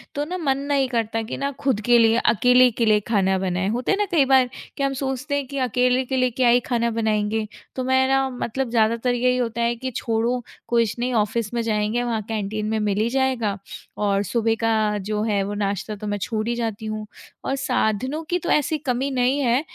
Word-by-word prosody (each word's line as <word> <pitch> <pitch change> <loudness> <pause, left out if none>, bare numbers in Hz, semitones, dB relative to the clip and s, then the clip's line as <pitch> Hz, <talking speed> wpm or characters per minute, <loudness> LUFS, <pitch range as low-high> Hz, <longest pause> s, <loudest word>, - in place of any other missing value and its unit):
तो 290 - -1
ना 360 +4 -4
मन 275 -6 0
नहीं 270 -2 +2
करता 225 -2 -1
कि 220 - -5
ना 280 0 -1
खुद 265 -6 +1
के 240 0 +6
लिए 225 0 +4
अकेले 250 +3 +5
के 230 +1 0
लिए 215 -1 +4
खाना 190 -4 +2
बनाए। 185 0 -1
होता 240 +3 -1
है 395 - +2
ना 415 - +1
कई 310 -6 +4
बार 260 -2 +4 0.3
कि 275 - -1
हम 275 0 +1
सोचते 265 +2 -3
हैं 285 -1 -1
कि 280 - -6
अकेले 250 +2 +2
के 265 +1 -2
लिए 255 0 +3
क्या 245 0 +2
ही 245 +1 +5
खाना 235 -1 +1
बनाएँगे, 220 -1 0 0.3
तो 255 - -2
मैं 260 0 +3
ना 270 0 +2
मतलब 250 0 -3
ज़्यादातर 230 +2 +2
यही 250 +1 +2
होता 235 -1 -2
है 235 0 +1
कि 260 +2 -5
छोड़ो 235 +2 0 0.3
कुछ 235 -2 +1
नहीं 250 +1 -1
ऑफिस 220 0 0
में 235 - 0
जाएँगे 220 +1 0
वहाँ 230 -3 -1
कैंटीन 215 -1 -2
में 220 0 0
मिल 205 -2 0
ही 230 - +1
जाएगा 255 -6 0 0.4
और 200 -1 +1
सुबह 225 +2 0
का 215 -2 +2
जो 210 0 0
है 210 -3 +1
वो 205 - -4
नाश्ता 200 +2 -2
तो 210 +1 -7
मैं 205 0 -1
छोड़ 220 -1 -2
ही 240 - 0
जाती 225 -2 -3
हूँ। 215 0 -4 0.4
और 270 - 0
साधनों 265 +2 -1
की 355 - +1
तो - - -5
ऐसी 300 +1 +2
कमी 270 -1 -1
नहीं 255 +2 +1
है 250 -2 +2
235 Hz, 225 wpm, -23 LUFS, 215-260 Hz, 0.4 s, के